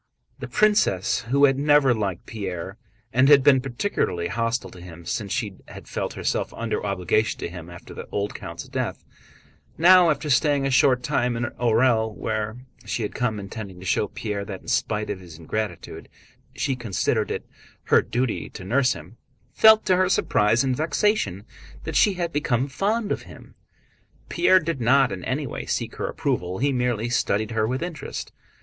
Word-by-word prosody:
The - - -6
princess, 205 - +2
who 140 +2 +5
had 135 -1 +2
never 145 -3 +4
liked 100 -6 -3
Pierre 95 -1 -6 0.3
and 130 +3 +4
had 140 -2 +7
been 135 -2 +5
particularly 120 - -2
hostile 115 +1 -2
to 90 - -12
him 85 -1 -11
since 100 +3 -3
she 105 -7 -2
had - - -11
felt - - -3
herself - - -2
under 115 -1 -3
obligations 100 +2 0
to - - -3
him 85 -1 -9
after 85 0 -11
the - - -8
old 100 0 -2
count's - - -8
death, - - -3 0.7
now 180 +1 +7
after 155 0 -1
staying 140 +1 +2
a 135 - 0
short 130 -1 +4
time 120 0 0
in 120 - -2
Orël—where 110 -1 0 0.2
she 115 - -3
had 105 - -4
come 110 -4 -1
intending 100 -2 -8
to 95 - -10
show 100 +3 +1
Pierre 105 -1 -4
that 100 -2 -7
in - - -18
spite 105 0 0
of 100 - -5
his 85 -4 -12
ingratitude 105 +6 -5 0.5
she 135 - -1
considered 115 -7 -1
it - - -4 0.4
her - - +4
duty 125 -1 -2
to 95 - -10
nurse 130 +6 +2
him—felt 130 - +2
to 185 - +3
her 185 0 +2
surprise 110 - +2
and 130 -2 0
vexation 150 - 0 0.4
that - - -5
she 205 - +5
had 170 -2 -3
become 135 -3 0
fond 205 - -1
of - - -1
him. - - -14 0.8
Pierre 185 - +4
did 160 -5 -3
not 130 +3 +4
in 90 - -5
any 140 +3 -1
way 125 - -6
seek - - -3
her - - -2
approval, 90 +1 -2
he 140 +4 +1
merely 125 -3 0
studied 110 -2 0
her 110 -1 +1
with 130 +6 -2
interest. 175 -2 -6
120 Hz, 175 wpm, -24 LUFS, 100-140 Hz, 0.8 s, had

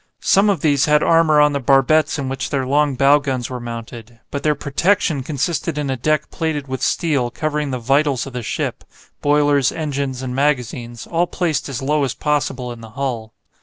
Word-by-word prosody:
Some 200 +2 +4
of 195 - 0
these 145 -3 +3
had 150 0 +3
armour 165 -2 +4
on 150 0 +4
the 140 - 0
barbettes 140 +4 +3
in 140 -2 -3
which 135 0 -3
their 135 -3 -1
long 145 +1 +2
bow 140 +3 +5
guns 130 -4 -3
were 125 - -4
mounted, 115 -1 -8
but 140 - -3
their 150 -1 +1
"protection" 150 +1 0
consisted 145 +2 -2
in 145 -2 -1
a - - 0
deck 155 +4 -1
plated 155 -4 -2
with 130 -1 -4
steel 145 -8 0
covering 150 +2 -2
the 130 - -2
"vitals" 135 +2 +1
of 135 - -9
the 125 - -4
ship, - - -3 0.4
boilers, 145 -2 +3
engines, 140 -4 -3
and 125 -1 -4
magazines, 125 -4 -1
all 170 +1 0
placed 160 -6 -2
as 135 -1 -4
low 150 +1 +1
as 130 - -2
possible 135 -4 -1
in 120 -1 -9
the 115 - -10
hull. 115 -3 -4
140 Hz, 200 wpm, -19 LUFS, 130-150 Hz, 0.4 s, bow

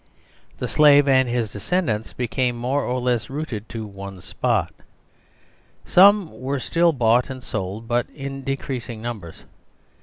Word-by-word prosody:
The - - -3
Slave 145 -1 +6
and 130 -2 +4
his 120 -3 -1
descendants 110 - -1
became 125 +1 -1
more 130 +4 -1
or 125 +1 -1
less 120 -2 -1
rooted 130 -7 -5
to 115 -1 -5
one 100 -2 -9
spot. - - -1 1.1
Some 200 -1 +6
were 135 +2 -2
still 170 +5 +2
bought 120 -3 +2
and 130 -1 -7
sold, 100 +3 -5
but 120 0 0
in 135 -1 -7
decreasing 130 -4 -4
numbers. 105 -9 -7
125 Hz, 140 wpm, -22 LUFS, 115-140 Hz, 1.1 s, Slave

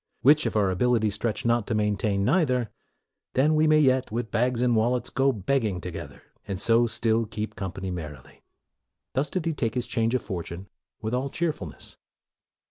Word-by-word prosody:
Which, 150 +3 +5
if - - -4
our 100 -3 +3
ability 110 +2 +2
stretch 105 +2 -2
not 115 -2 +2
to 115 - -1
main 105 -1 +1
tain 100 -1 0
neither, 130 - +2 0.6
then 150 +4 +3
may 155 +1 +4
we 155 0 +5
yet, 130 -4 +3
with 115 0 -3
bags 125 +1 +1
and 120 -2 +3
wallets, 120 +3 +1
go 135 +2 +2
a - - +1
begging 110 -2 0
together, - - -8 0.2
and 95 -2 -3
so 115 +3 +4
still 115 0 +1
keep 105 0 -5
company 95 0 -5
merrily." 75 -6 -8 0.7
Thus 135 +2 0
did 180 0 -3
he 165 - 0
take 115 -6 -2
his 125 -1 -1
change 115 0 0
of 130 - -1
fortune 90 0 -6 0.4
with 110 +2 -2
all 130 +2 -1
cheerfulness. 150 - -4
115 Hz, 185 wpm, -26 LUFS, 105-130 Hz, 0.7 s, Which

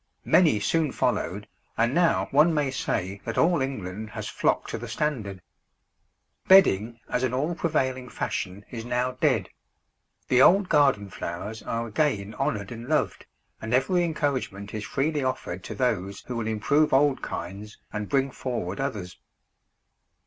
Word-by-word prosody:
Many 160 - +4
soon 155 +8 +1
followed, - - -1 0.3
and 115 +3 +2
now 170 +1 +3
one 155 +4 +5
may 145 -3 +1
say 100 -6 -2
that 115 - -4
all 170 -3 +3
England 110 -5 -4
has - - -6
flocked - - 0
to - - -3
the - - -7
standard. 105 -11 -3 1.0
Bedding 115 - +5
as 125 - -1
an 130 -1 0
all 150 +6 0
prevailing 130 -7 -1
fashion 95 -1 -4
is 115 -2 -5
now 125 +1 0
dead; 140 -7 +2 0.8
the 125 0 +4
old 190 +6 +6
garden 135 -10 +3
flowers 105 +8 -5
are 115 0 -3
again 110 -4 0
honoured 105 -6 -2
and 120 +2 -8
loved, 155 - 0 0.3
and 110 +2 0
every 175 +7 +2
encouragement 135 - -2
is 110 -1 -4
freely 145 +8 -1
offered 95 -8 -3
to - - -6
those 100 -7 -1
who 125 - -6
will 115 -2 -2
improve 140 +8 +2
old 140 0 +3
kinds 100 +5 -6 0.2
and 105 -1 -4
bring 135 -1 +1
forward 115 -9 -4
others. 105 -10 -4
125 Hz, 150 wpm, -26 LUFS, 105-145 Hz, 1.0 s, old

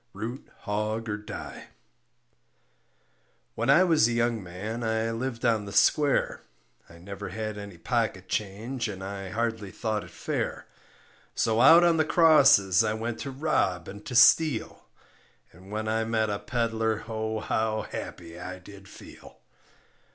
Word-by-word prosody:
ROOT 120 +5 -7
HOG 110 +1 -2
OR 105 - -2
DIE 105 - -9 1.9
When 115 +3 -2
I 160 +7 +6
was 160 -10 +4
a 120 - -1
young 115 -1 0
man 100 +6 -6
I 110 0 -1
lived 120 +1 -4
on 110 -3 +2
the 100 - -8
square, 145 +6 +2 0.5
I 85 - -14
never 100 +3 -8
had 110 -1 -4
any 100 -3 -9
pocket 110 -1 -2
change 115 +5 -3
and 95 -2 -7
I 95 0 -6
hardly 115 -1 -2
thought 110 +1 -3
it - - -12
fair; - - -4 0.7
So 115 0 +1
out 165 +6 +8
on 170 -1 +4
the 155 - +3
crosses 145 - +5
I 110 0 -1
went 115 +1 -4
to 140 - -5
rob 130 - -1
and 100 +1 -9
to 125 - -5
steal, 125 +2 +4 0.7
And 90 +3 -16
when 110 +1 -4
I 110 +1 0
met 110 -1 0
a 100 - -2
peddler 115 -2 -1
oh, 110 -1 -3
how 110 0 -1
happy 85 0 -8
I 90 +1 -7
did 95 +1 -14
feel. - - -14
110 Hz, 150 wpm, -27 LUFS, 100-120 Hz, 1.9 s, out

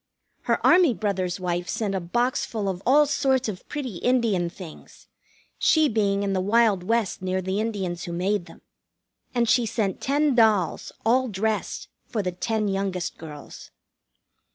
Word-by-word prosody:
Her - - +1
Army 350 -9 +5
brother's 190 -3 -2
wife 175 -1 -2
sent 210 -3 -2
a 190 - 0
box 240 +9 0
full 215 -3 -3
of 185 -1 -3
all 295 +4 +6
sorts 265 -3 +1
of 190 -4 -7
pretty 260 -10 -4
Indian 225 -7 +1
things, 170 -3 -12 0.5
she 315 -1 +4
being 205 -4 +1
in 200 -1 -1
the 190 - 0
wild 210 -1 +3
West 225 0 -1
near 185 0 -1
the 190 +2 -2
Indians 195 -5 -3
who 175 - -6
made 185 +2 -1
them. - - -15 0.7
And 235 -1 +2
she 240 0 +3
sent 205 -4 -2
ten 285 +1 +2
dolls, 215 -8 +2
all 255 +3 +3
dressed, 215 0 -2 0.2
for 215 -4 -2
the 180 - -1
ten 215 +4 -1
youngest 195 -2 -2
girls. 150 -3 -10
205 Hz, 160 wpm, -25 LUFS, 185-235 Hz, 0.7 s, all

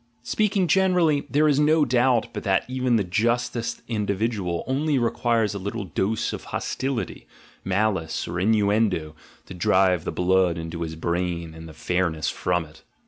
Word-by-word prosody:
Speaking 205 -3 +1
generally, 180 -6 +2
there 150 +2 +3
is 145 -1 +3
no 150 +1 +4
doubt 125 -2 +2
but - - -4
that 95 -2 +1
even 130 -1 0
the 110 - +2
justest 115 +5 -1
in 105 -3 -2
dividual 100 -4 -1
only 140 +2 0
requires 115 -2 +1
a 100 - -4
little 100 +3 -4
dose 95 +4 -1
of - - -7
hostility, 130 -3 -3 0.4
malice, 95 -4 -1
or 85 +1 -3
innuendo 100 -5 +1 0.3
to - - -9
drive 90 -1 +2
the - - -3
blood 90 -1 +2
into 80 +1 -6
his 80 -1 -4
brain 85 0 -2
and 80 0 -10
the - - -11
fairness 80 -1 -1
from 90 -2 -1
it. 80 +1 -17
100 Hz, 160 wpm, -24 LUFS, 90-125 Hz, 0.4 s, no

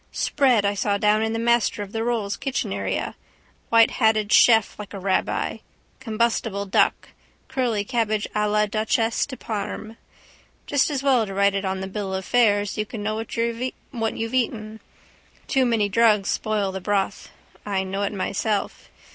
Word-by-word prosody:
Spread 250 -8 +2
I 200 - +2
saw 200 0 0
down 210 +1 +3
in 220 0 0
the 225 - -2
Master 235 -2 +1
of 200 - -10
the 225 0 -2
Rolls' 225 -4 -1
kitchen 270 -1 -3
area. - - -3 0.6
Whitehatted 220 -2 +3
chef 225 -4 +5
like 205 -1 -8
a - - -5
rabbi. 190 0 -1 0.4
Combustible 225 -4 -1
duck. 195 - +1 0.4
Curly 250 -6 0
cabbage 215 -2 -1
à 210 0 +1
la 210 0 +3
duchesse 220 +2 0
de 260 -3 -8
Parme. 215 0 -5 0.7
Just 285 +1 +2
as 275 -2 -2
well 255 -6 +3
to 195 - -6
write 200 0 +3
it 195 0 -2
on 190 0 -2
the 190 - -4
bill 195 -1 -4
of 190 0 -4
fare 210 -4 +3
so 205 +1 -3
you - - -3
can 215 -2 -6
know 215 +1 -1
what 225 +1 -5 0.8
you've 225 +2 -3
eaten. 220 -3 -2 0.7
Too 265 -2 +2
many 225 -3 +2
drugs 210 -1 +3
spoil 210 -3 -1
the 190 0 -5
broth. 200 0 -1 0.3
I 195 -2 -1
know 190 +1 -3
it 200 - 0
myself. 200 +1 -2
215 Hz, 170 wpm, -23 LUFS, 200-230 Hz, 0.8 s, chef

